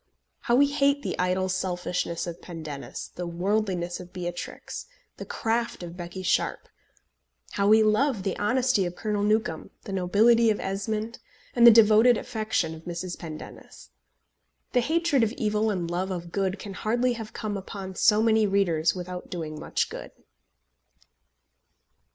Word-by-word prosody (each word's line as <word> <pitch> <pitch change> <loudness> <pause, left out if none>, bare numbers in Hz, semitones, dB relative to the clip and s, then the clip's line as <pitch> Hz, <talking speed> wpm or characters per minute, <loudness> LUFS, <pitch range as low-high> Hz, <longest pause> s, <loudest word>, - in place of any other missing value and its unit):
How 240 - +1
we 280 +3 +6
hate 280 0 +1
the - - -2
idle 185 +1 +1
selfishness 180 -2 -2
of 170 -1 -7
Pendennis, 155 -5 -7
the 175 0 -5
worldliness 180 0 -1
of 180 -1 -10
Beatrix, 175 -1 -6 0.3
the - - -8
craft 230 -3 -1
of 170 0 -8
Becky 180 +1 -7
Sharpe! - - 0 0.8
how 200 0 +1
we 220 +1 +6
love 215 0 +2
the 195 - -1
honesty 250 0 +2
of 175 - -7
Colonel 210 0 -2
Newcombe, 210 -6 0
the 195 - -6
nobility 220 +5 +4
of 215 - +1
Esmond, 215 +4 -3 0.4
and 235 -1 +7
the - - +13
devoted 220 +1 +6
affection 215 -8 -2
of 160 0 -11
Mrs. 175 +1 -4
Pendennis! 155 - -10 0.8
The - - +4
hatred 320 0 +2
of 225 0 +1
evil 215 -1 0
and 180 -5 -1
love 185 +2 -1
of 175 -2 -5
good 195 0 -1
can 195 0 -8
hardly 240 +6 0
have 225 -2 -7
come 210 -1 -4
upon 195 -1 -6
so 210 +3 +4
many 220 -1 +4
readers 175 -5 +2
without 180 0 -6
doing 155 -3 -5
much - - -1
good. - - -7
200 Hz, 150 wpm, -26 LUFS, 180-220 Hz, 0.8 s, the